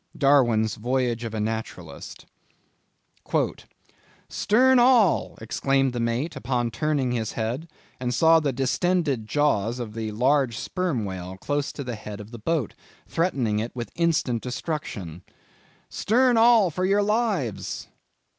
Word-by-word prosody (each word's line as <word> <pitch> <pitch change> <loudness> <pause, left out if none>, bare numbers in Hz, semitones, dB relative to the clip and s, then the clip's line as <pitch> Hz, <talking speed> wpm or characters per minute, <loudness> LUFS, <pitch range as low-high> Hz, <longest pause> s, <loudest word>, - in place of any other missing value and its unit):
—Darwin's 120 -7 +3
Voyage 120 0 -1
of 115 -1 -5
a - - -2
Naturalist. 110 +1 -5 2.0
"'Stern 255 +5 +4
all!' 240 -7 +4
exclaimed 135 +4 0
the 120 - -3
mate, 120 +7 -1
as - - -9
upon 120 -2 -1
turning 135 +2 0
his 115 -3 -2
head, 120 +8 -3 0.4
he 125 - 0
saw 160 +7 +5
the 150 -3 0
distended 135 -1 0
jaws 120 -4 +1
of 115 -3 -6
a 110 -1 -3
large 125 +2 +1
Sperm 155 - -2
Whale 95 -1 -6
close 145 +7 -2
to 140 - -6
the 125 -2 -4
head 105 -1 -8
of 105 +1 -10
the 120 - -9
boat, 150 0 -1 0.3
threatening 130 - 0
it 115 +3 -4
with 120 -1 -5
instant 155 -9 0
destruction;—'Stern 150 - -3
all, 225 -5 +5
for 180 +4 -3
your 200 +2 +3
lives! 205 - -1
130 Hz, 135 wpm, -25 LUFS, 115-165 Hz, 2.0 s, saw